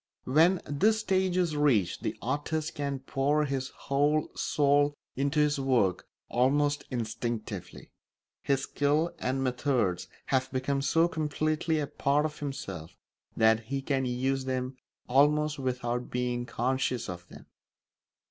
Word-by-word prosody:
When 165 +7 +4
this 215 +10 +2
stage 185 -3 +1
is 170 -4 +1
reached 130 -11 +2
the - - -3
artist 145 +5 -2
can 140 -2 -3
pour 145 +3 +1
his 135 -2 -2
whole 145 +2 0
soul 145 0 +2 0.2
into 140 +3 0
his 150 -1 +2
work 125 -9 +1 0.2
almost 145 +4 +2
instinctively; 115 -4 -4 0.5
his 135 -1 +1
skill 150 +5 +1
and 130 +1 -1
methods 125 -7 0 0.2
have 130 -1 0
become 135 +1 -1
so 165 +5 +3
completely 155 0 -1
a 150 - 0
part 140 +1 +1
of 150 -1 -4
himself 100 - -6 0.4
that 110 0 +4
he 135 +3 -3
can 135 -1 0
use 130 +2 -1
them 130 0 -2 0.3
almost 150 +3 +3
without 125 -2 -2
being 125 0 -2
conscious 130 0 -1
of 90 -2 -7
them. - - -13
135 Hz, 130 wpm, -29 LUFS, 125-150 Hz, 0.5 s, When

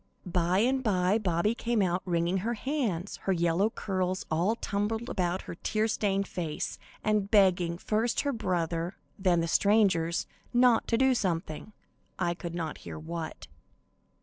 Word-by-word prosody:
By 180 0 +1
and 260 +3 +2
by 195 -1 +2
Bobby 185 +1 +1
came 235 -2 0
out 180 0 0
wringing 170 +1 +1
her 230 +6 -1
hands, 220 - -2
her - - +4
yellow 170 +3 +2
curls 185 -3 -2
all 175 +8 +2
tumbled 220 +2 -2
about 180 0 -1
her - - -7
tear 215 +5 0
stained 200 -2 0
face, 165 -5 -4 0.2
and 210 -2 +1
begging, 180 -5 +4
first 220 +5 0
her 285 -1 -1
brother, 175 -4 -1 0.2
then 180 -3 +3
the 165 - -1
strangers, 185 -3 +3 0.3
not 245 -2 +5
to 230 - +2
do 265 +1 +4
something, 175 -4 -2 0.5
I 175 -2 0
could 170 -1 -6
not 160 -3 -4
hear - - -8
what. 160 +1 -6
190 Hz, 150 wpm, -29 LUFS, 170-215 Hz, 0.5 s, not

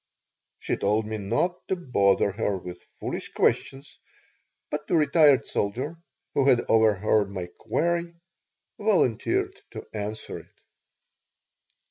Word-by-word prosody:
She - - -2
told 105 +2 +1
me 110 0 -4
not 175 - -1
to 190 - 0
bother 100 - +2
her 100 -1 -1
with 90 -1 -9
foolish - - -6
questions, 135 +1 0 0.7
but 150 0 -4
the 180 - +1
retired 150 -4 +5
soldier, 130 +11 -2 0.4
who 140 -1 +2
had 125 -3 +4
overheard 105 -2 +3
my 95 -3 -4
query, 170 0 -1 0.6
volunteered 220 - +1 0.2
to - - -7
answer 105 0 -5
it. - - -20
120 Hz, 115 wpm, -26 LUFS, 105-170 Hz, 0.7 s, retired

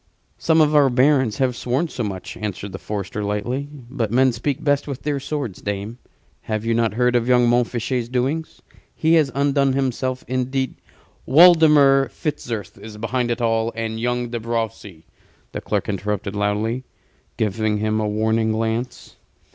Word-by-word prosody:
"Some 160 -1 +3
of 150 0 +3
our 145 -2 +6
barons 130 -1 +3
have 130 -3 +1
sworn 130 +8 -1
so 125 -6 -4
much," 95 -3 -5
answered 100 -1 -5
the - - -7
forester, 105 0 -4
lightly; 105 +7 -2
"but 125 -5 -5
men 130 +2 +4
speak 130 +4 -3
best 145 -1 +1
with 140 -2 -6
their 145 -2 -1
swords, 140 -8 -4
dame. 105 +4 -4 0.5
Have 110 0 -2
you 115 - +1
not 115 -2 +1
heard 125 +1 +2
of 120 0 +1
young 125 -1 +4
Montfichet's 120 0 0
doings? 135 +6 -2 0.3
He 160 +1 +2
has 155 -4 +4
undone 140 -1 +2
himself 130 -1 -2
indeed 130 +1 -1 0.3
" - - -35
"Waldemar 150 -3 +6
Fitzurse 115 - -5
is 110 -1 -10
behind 120 +2 -1
it 120 +1 -2
all, 115 0 +1
and 110 -1 -3
young 120 0 -1
De 120 0 -3
Brocy," 110 -7 -4 0.5
the - - -5
clerk - - -2
interrupted, 105 0 -3
loudly, 105 +4 -1 0.5
giving 110 0 0
him 110 +1 0
a 105 - 0
warning 110 +1 +1
glance. 115 +2 -3
120 Hz, 165 wpm, -21 LUFS, 110-135 Hz, 0.5 s, our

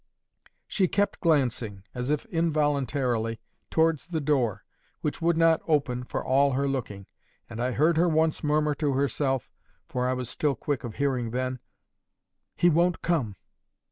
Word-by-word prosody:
She 190 -3 +1
kept 205 +3 0
glancing, 125 - 0
as 125 +1 -3
if 150 -1 0
involuntarily, 140 -8 0 0.3
towards 160 -2 +1
the 170 -3 -2
door, 125 -9 0 0.4
which 150 - -3
would 170 0 +2
not 165 -1 +4
open 135 -5 +1
for - - -4
all 140 +1 +3
her 140 +2 0
looking, 110 -8 -3 0.4
and 110 - -6
I 125 +1 0
heard 155 +5 +3
her 175 +2 +4
once 160 0 +1
murmur 150 0 +2
to 145 -1 -1
herself—for 135 -2 -2
I 130 - +1
was 125 -1 -3
still 140 +2 0
quick 145 -3 -3
of 115 -3 -6
hearing 130 -5 0
then—'He 130 +6 -5
won't 175 +1 +2
come! 135 - 0
140 Hz, 145 wpm, -27 LUFS, 125-160 Hz, 0.4 s, not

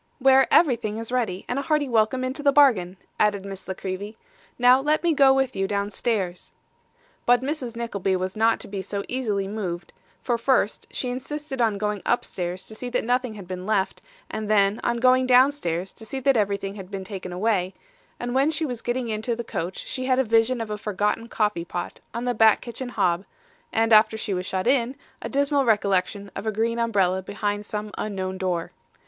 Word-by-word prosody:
' - - -41
Where 265 0 +5
everything 235 -9 +3
is 230 +1 -6
ready, 220 -7 -1
and 250 - -1
a - - -1
hearty 300 -1 +1
welcome 235 +2 +2
into 260 +3 -3
the 285 -1 +4
bargain,' 225 -11 +4 0.2
added 205 -2 +2
Miss 195 -1 -8
La 190 - -3
Creevy. 195 +3 -5 0.4
'Now, 250 +2 +6
let 305 +4 +1
me 340 -1 +3
go 275 -2 +6
with 265 -3 +1
you 195 0 0
downstairs.' 200 -2 -2 0.7
But 245 +1 +5
Mrs. 265 -5 -3
Nickleby 200 -5 -1
was 185 0 -3
not 225 +1 +3
to - - -8
be 195 -1 -4
so 200 +1 -4
easily 210 -7 -1
moved, 190 -4 -5 0.3
for 240 -2 0
first 230 -4 +1
she 250 - -3
insisted 270 +1 -5
on 220 -3 +2
going 210 -1 -2
upstairs 180 -6 -2
to - - -10
see 245 +3 -5
that - - 0
nothing 245 -1 0
had 195 -4 -10
been 185 +1 -6
left, 200 -3 0 0.3
and 215 -1 -5
then 205 0 +3
on 240 0 +1
going 255 +1 +4
downstairs 250 - +3
to - - -13
see 265 +4 -5
that 275 +1 +3
everything 200 -2 0
had 195 -3 -9
been 195 -1 -5
taken 185 -2 -7
away; 190 -1 0 0.4
and 245 0 -3
when 270 +3 +3
she 320 0 -1
was 245 -5 -4
getting 240 0 -2
into 220 +2 -2
the 235 - -4
coach 180 -4 -4
she 255 - -3
had 255 -1 +2
a 265 - +4
vision 230 +1 +2
of 220 -2 -5
a 210 - -3
forgotten 210 +2 -1
coffee 210 -7 0
pot 175 0 -5
on 235 +1 -4
the 245 - +1
back 220 -2 +5
kitchen 245 +1 -6
hob, 175 -6 +1 0.5
and 225 0 +2
after 215 +1 +6
she 215 -2 -3
was 185 0 -3
shut 185 -1 -2
in, 255 -1 +2 0.3
a - - -5
dismal 280 0 +2
recollection 200 -3 +1
of 200 +3 -5
a - - +2
green 230 +2 0
umbrella 195 -5 +2
behind 205 +2 -3
some 210 0 -4
unknown 190 -2 -3
door. 180 -3 -2
220 Hz, 205 wpm, -24 LUFS, 195-250 Hz, 0.7 s, Now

